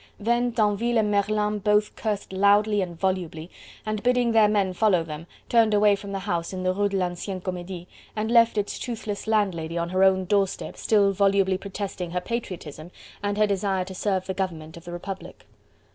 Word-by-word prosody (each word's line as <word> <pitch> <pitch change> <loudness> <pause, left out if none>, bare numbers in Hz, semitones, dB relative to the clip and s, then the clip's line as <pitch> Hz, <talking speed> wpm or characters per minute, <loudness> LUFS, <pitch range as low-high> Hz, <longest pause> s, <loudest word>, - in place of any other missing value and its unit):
Then 240 +3 +1
Tinville 225 +1 +1
and 210 -1 +2
Merlin 210 +1 +1
both 210 +1 +2
cursed 210 -3 -3
loudly 205 +2 +3
and 175 -3 -5
volubly, 180 -3 -2 0.3
and 215 -1 -2
bidding 245 0 +2
their 220 -2 +5
men 200 -3 +1
follow 185 -3 +3
them, 160 +1 -8 0.2
turned 225 -3 +4
away 205 0 +5
from 200 0 -8
the 195 - -2
house 175 -4 -2
in 185 0 -4
the 185 0 +1
Rue 205 +1 +1
de 195 - -1
l'Ancienne 185 +1 -3
Comedie 180 -1 -6 0.3
and 220 +1 -2
left 230 -2 +5
its 205 -1 -2
toothless 220 -4 -5
landlady 180 -7 0
on 170 0 -1
her 185 +1 +2
own 190 -1 +4
doorstep 195 0 0
still 205 -2 +3
volubly 195 -1 +2
protesting 195 -2 -5
her 180 +1 -1
patriotism 175 -8 -6 0.3
and 205 0 -2
her 215 - +4
desire 195 -2 0
to 190 - -8
serve 190 0 -1
the 190 - -3
government 165 -5 -4
of 170 +1 -12
the 175 - -7
Republic. 190 +2 -8
200 Hz, 190 wpm, -25 LUFS, 185-210 Hz, 0.3 s, their